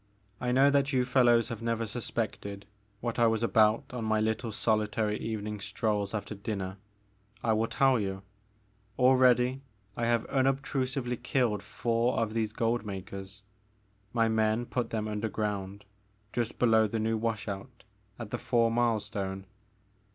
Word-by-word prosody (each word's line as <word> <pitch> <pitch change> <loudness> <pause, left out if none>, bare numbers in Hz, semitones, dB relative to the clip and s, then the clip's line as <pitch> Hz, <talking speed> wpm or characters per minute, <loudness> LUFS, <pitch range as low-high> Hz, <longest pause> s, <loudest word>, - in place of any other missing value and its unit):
I 125 - -1
know 135 +3 +5
that 140 0 +2
you 130 -2 +2
fellows 120 -2 +4
have 115 -2 -5
never 115 0 -1
suspected 105 -3 -4 0.4
what 120 0 -2
I 120 - +6
was 110 0 +1
about 110 -1 +4
on 125 -2 -3
my 110 0 +1
little 110 +2 -1
solitary 105 0 +1
evening 105 -1 -4
strolls 105 0 -1
after 105 0 -4
dinner. 100 -2 -4 0.7
I 110 - +3
will 110 +1 +1
tell 135 -2 +3
you. 95 -1 -3 0.7
Already 130 0 +4 0.3
I 120 - -1
have 120 -1 +2
unobtrusively 135 -2 0
killed 120 -4 0
four 115 +4 0
of 110 -2 0
these 110 -2 0
gold 115 +1 0
makers, 100 0 -7 0.3
— 100 +2 -29
^my 115 -1 +4
men 110 +1 +1
put 125 0 -2
them 110 -1 -2
under 105 +1 -2
ground 100 -2 -3 0.5
just 120 -2 -2
below 110 -2 +4
the 115 - -3
new 110 +1 0
wash 110 -2 -2
out 105 +5 -7 0.3
at 110 -3 -7
the - - -2
four 115 -2 +2
mile 115 -1 +2
stone. 95 -2 -4
110 Hz, 155 wpm, -30 LUFS, 105-120 Hz, 0.7 s, I